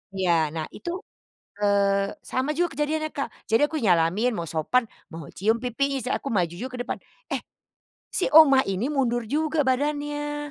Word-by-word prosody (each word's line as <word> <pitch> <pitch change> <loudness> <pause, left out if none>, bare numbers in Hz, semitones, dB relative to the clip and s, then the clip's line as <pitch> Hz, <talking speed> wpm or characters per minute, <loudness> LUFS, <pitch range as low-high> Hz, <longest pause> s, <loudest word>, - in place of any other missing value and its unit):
Iya, 185 -2 +1 0.2
nah 155 -1 -2
itu, 345 - -7 0.7
eee, 200 -1 +2 0.2
sama 260 +3 0
juga 345 -4 0
kejadiannya 310 +2 -1
Kak, 275 - -2 0.2
jadi 225 +5 +3
aku 315 - -2
nyalamin, 195 - +2
mau 170 - -3
sopan, 165 +11 +2 0.3
mau 165 -3 -9
cium 225 +5 0
pipi, 270 +2 -1
se 250 - -4
aku 275 - -1
maju 175 -4 +1
juga 255 +5 -5
ke - - -5
depan. - - -4 0.3
Eh, - - -1 0.7
si - - 0
oma 275 -4 +8
ini 195 +4 -1
mundur 250 -5 +1
juga 310 +1 +1
badannya. 295 +2 -1
255 Hz, 165 wpm, -25 LUFS, 200-295 Hz, 0.7 s, oma